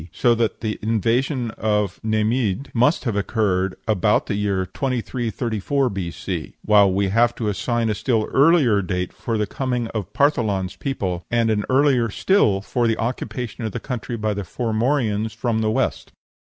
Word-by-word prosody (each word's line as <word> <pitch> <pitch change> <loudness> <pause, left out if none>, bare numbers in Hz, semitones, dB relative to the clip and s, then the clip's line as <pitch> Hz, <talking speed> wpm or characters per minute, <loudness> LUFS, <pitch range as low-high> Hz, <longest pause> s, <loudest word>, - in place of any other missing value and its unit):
so 120 - +3
that 115 -1 -1
the 110 -2 -3
invasion 115 +3 0
of 105 -3 0
Neimhidh 110 +2 0
must 125 +4 +2
have 115 -5 -1
occurred 95 -3 0
about 105 0 +2
the - - -2
year 100 -2 0
2334 120 +2 -1
B.C.; 90 -2 -5
while 100 -2 +5
we 100 +2 +1
will 95 - -1
have 120 +3 +3
to 110 - -3
assign 115 +3 0
a 110 - +1
still 110 +1 0
earlier 140 -8 +4
date 90 -1 -3
for 115 -2 -3
the 105 - +1
coming 125 +1 -2
of 105 -6 -5
Partholan's 110 -10 +1
people, 95 -11 -3
and 115 -1 +2
an 105 -1 0
earlier 130 -3 +3
still 105 - +2
for 120 +4 0
the 115 - +1
occupation 120 0 -4
of 110 -3 -3
the - - -3
country 125 -2 -4
by 110 -1 -1
the 100 - -3
Formorians 110 - -1
from 110 -1 -1
the 110 - +1
West. 110 - -1
110 Hz, 170 wpm, -22 LUFS, 100-120 Hz, -, while